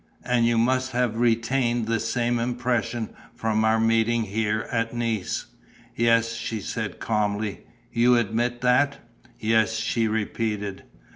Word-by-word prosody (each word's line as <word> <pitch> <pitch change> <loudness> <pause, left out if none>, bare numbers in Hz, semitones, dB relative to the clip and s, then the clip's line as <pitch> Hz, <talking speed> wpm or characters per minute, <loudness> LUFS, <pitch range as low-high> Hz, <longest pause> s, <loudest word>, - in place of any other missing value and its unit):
And 120 -2 +2
you 120 0 +2
must 130 +2 +1
have 120 -2 0
retained 120 0 +1
the 115 0 0
same 120 +1 0
impression 120 -2 -1 0.2
from 110 -1 0
our 110 0 +3
meeting 115 +1 +2
here, 110 +1 -1
at 115 0 -1
Nice." 115 -5 -2 0.5
"Yes," 115 0 +3
she 115 -1 -4
said, - - -4
calmly. 105 -2 -1 0.3
"You 120 +1 +4
admit 120 +2 0
that?" 125 +3 +3 0.4
"Yes," 110 0 +2
she 110 +1 0
repeated. 105 -2 -2
115 Hz, 130 wpm, -25 LUFS, 110-120 Hz, 0.5 s, You